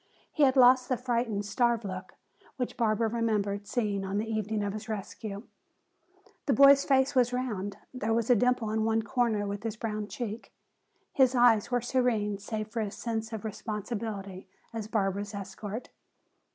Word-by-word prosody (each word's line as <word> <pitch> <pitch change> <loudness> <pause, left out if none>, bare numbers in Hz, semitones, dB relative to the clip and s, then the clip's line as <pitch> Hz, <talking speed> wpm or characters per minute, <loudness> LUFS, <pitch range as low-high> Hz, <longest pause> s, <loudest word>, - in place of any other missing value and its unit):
He 305 - -2
had 270 -2 +5
lost 255 0 +6
the 255 - +1
frightened, 235 -4 -1
starved 235 +1 +1
look 185 -1 -6 0.4
which 250 -2 -3
Barbara 225 -1 +1
remembered 210 -3 -1
seeing 210 -5 -1
on 195 +1 -2
the 215 - 0
evening 215 -1 -1
of 200 -1 -2
his 215 +1 -7
rescue. 205 0 -5 1.0
The 275 - +4
boy's 280 +2 +7
face 270 0 +3
was 250 -2 +3
round, 210 -6 -3 0.2
there 225 -3 -2
was 230 0 +1
a - - +7
dimple 245 -1 +1
in 220 0 0
one 225 0 +1
corner 225 -5 0
of 200 - -6
his 225 -1 -3
brown 215 -2 -3
cheek. 225 -1 -6 0.6
His 260 -1 +4
eyes 240 -4 +5
were 245 -1 +1
serene 230 -5 0
save 215 +1 -4
for 230 0 -2
his 205 -1 -4
sense 225 -1 -3
of 220 -1 -5
responsibility 210 -3 -5 0.3
as 220 -2 -4
Barbara's 205 -1 -1
escort. 200 +3 -6
220 Hz, 165 wpm, -29 LUFS, 205-245 Hz, 1.0 s, boy's